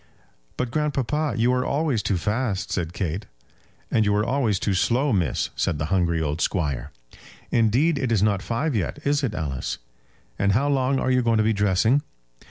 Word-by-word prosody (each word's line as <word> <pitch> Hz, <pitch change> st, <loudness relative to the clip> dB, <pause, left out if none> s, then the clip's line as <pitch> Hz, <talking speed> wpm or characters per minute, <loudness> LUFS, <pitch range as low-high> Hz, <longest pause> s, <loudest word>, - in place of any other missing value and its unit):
"But, 125 Hz, -2 st, -2 dB
grandpapa, 150 Hz, +1 st, 0 dB
you 120 Hz, +2 st, +3 dB
are 125 Hz, 0 st, +1 dB
always 140 Hz, -6 st, 0 dB
too 100 Hz, -, 0 dB
fast," 105 Hz, +1 st, -1 dB
said 85 Hz, -3 st, -2 dB
Kate. 90 Hz, +3 st, -3 dB, 0.6 s
"And 110 Hz, -, +3 dB
you 105 Hz, 0 st, +2 dB
are 105 Hz, +1 st, +1 dB
always 120 Hz, -6 st, +1 dB
too 100 Hz, -, -1 dB
slow, 125 Hz, +8 st, +2 dB
miss," 85 Hz, -9 st, 0 dB
said 75 Hz, -, 0 dB
the 75 Hz, +5 st, -2 dB
hungry 85 Hz, -3 st, +2 dB
old 80 Hz, +1 st, -2 dB
squire. 75 Hz, -8 st, -1 dB, 0.6 s
"Indeed, 130 Hz, +8 st, +3 dB
it 130 Hz, -3 st, -1 dB
is 105 Hz, -4 st, +3 dB
not 100 Hz, -3 st, +2 dB
five 125 Hz, +6 st, -1 dB
yet. 100 Hz, +5 st, -1 dB
Is 145 Hz, +1 st, +1 dB
it, 120 Hz, -6 st, -1 dB
Alice?" 70 Hz, -5 st, -3 dB, 0.6 s
"And 100 Hz, 0 st, +3 dB
how 140 Hz, +7 st, +2 dB
long 135 Hz, -1 st, +2 dB
are 130 Hz, -, 0 dB
you 125 Hz, 0 st, +3 dB
going 115 Hz, -2 st, +2 dB
to 110 Hz, -, +3 dB
be 110 Hz, +1 st, +2 dB
dressing?" 105 Hz, +6 st, +2 dB
110 Hz, 185 wpm, -24 LUFS, 95-130 Hz, 0.6 s, you